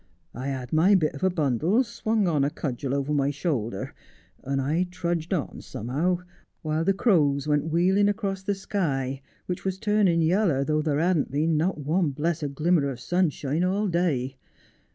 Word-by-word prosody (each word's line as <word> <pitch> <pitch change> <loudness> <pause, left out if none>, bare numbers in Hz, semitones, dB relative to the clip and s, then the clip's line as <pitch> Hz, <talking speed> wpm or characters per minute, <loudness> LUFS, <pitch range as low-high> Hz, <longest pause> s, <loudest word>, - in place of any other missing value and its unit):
I 130 +3 -5
had 130 -1 -4
my 180 +6 +5
bit 155 -5 +2
of 140 - -8
a 190 - +4
bundle 165 - +1
swung 220 -3 -1
on 150 -5 +2
a 140 - +2
cudgel 135 -2 -3
over 140 +1 -1
my 140 -1 +2
shoulder, 135 - -3 0.5
and 135 +1 -1
I 155 +7 0
trudged 170 -1 -3
on 175 -7 -2
somehow, 160 - -2 0.4
while 155 +1 0
the 195 - +3
crows 150 - +2
went 150 +1 +1
wheeling 190 +5 +3
across 200 -2 -2
the 200 +1 -1
sky, 140 -10 -2 0.2
which 180 - -4
was 190 -1 -2
turning 195 -5 +2
yaller, 165 -5 +2
though 155 +1 +1
there 150 -2 0
hadn't 170 -1 +1
been 155 +4 +1
not 165 +4 +1
one 155 +3 +1
blessed 150 0 -2
glimmer 155 -1 +2
of 130 -3 -6
sunshine 160 -1 0
all 200 +3 +1
day. 145 -8 0
160 Hz, 175 wpm, -26 LUFS, 140-185 Hz, 0.5 s, my